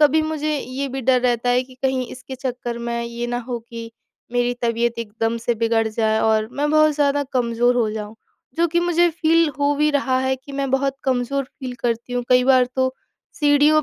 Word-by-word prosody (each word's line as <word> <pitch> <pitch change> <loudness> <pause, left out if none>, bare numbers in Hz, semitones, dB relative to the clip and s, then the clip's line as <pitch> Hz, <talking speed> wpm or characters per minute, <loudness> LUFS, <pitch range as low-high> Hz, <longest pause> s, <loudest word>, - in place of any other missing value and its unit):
कभी 305 +1 +5
मुझे 310 -1 -1
ये 265 +2 -4
भी 265 +1 -4
डर 255 0 +3
रहता 245 -1 +1
है 250 +1 +3
कि 255 - -16
कहीं 260 -2 0
इसके 260 +1 -9
चक्कर 245 -2 -4
में 235 0 -3
ये 235 +1 -4
ना 245 - -1
हो 240 - -2
कि 230 -1 -7 0.4
मेरी 245 0 +1
तबियत 235 0 0
एकदम 225 +1 -2
से 240 - +1
बिगड़ 225 0 +1
जाए 220 0 +1
और 220 0 +2
मैं 295 +1 -1
बहुत 310 0 +5
ज़्यादा 285 -1 +2
कमज़ोर 240 -1 +2
हो 225 -3 +1
जाऊँ, 215 0 -6 0.4
जो 340 - +3
कि 345 +2 +1
मुझे 345 0 +3
फील 330 0 +3
हो 285 0 +2
भी 300 +1 +3
रहा 270 -2 +1
है, 260 0 +1
कि 270 +2 -13
मैं 275 -1 -2
बहुत 270 0 +1
कमजोर 265 +1 0
फील 260 -1 -8
करती 235 +1 -2
हूँ। 245 0 -1
कई 250 0 +5
बार 260 -1 +5
तो 260 0 +1 0.5
सीढ़ियों 295 +1 +5
255 Hz, 210 wpm, -21 LUFS, 235-285 Hz, 0.5 s, कभी